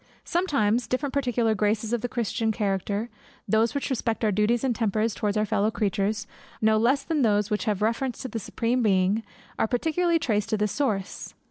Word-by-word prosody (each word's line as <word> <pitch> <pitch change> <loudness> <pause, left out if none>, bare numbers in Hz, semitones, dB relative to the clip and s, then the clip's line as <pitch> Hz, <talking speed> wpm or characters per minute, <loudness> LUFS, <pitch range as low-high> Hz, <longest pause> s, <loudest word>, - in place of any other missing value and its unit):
Sometimes 245 - +1
different 260 +2 -2
particular 245 -5 +1
graces 215 +2 0
of 240 - 0
the 245 - -2
Christian 225 -1 -1
character, 205 +1 -1 0.4
those 220 +3 +2
which 280 - -2
respect 230 -2 -1
our 215 - +3
duties 210 +4 +1
and 255 -3 +1
tempers 220 0 0
towards 210 0 -1
our 215 - +2
fellow 215 -1 +1
creatures, 210 0 -1 0.3
no 220 0 +3
less 250 +6 +2
than 315 -3 0
those 210 -2 +2
which 210 - 0
have 210 -2 0
reference 235 +3 -1
to - - -3
the 230 - -4
Supreme 235 +4 -1
Being, 195 0 +2 0.4
are - - +2
particularly 325 +8 +1
traced 220 -8 0
to 215 - +1
this 210 -1 0
source. 210 -10 -2
220 Hz, 190 wpm, -26 LUFS, 210-245 Hz, 0.4 s, our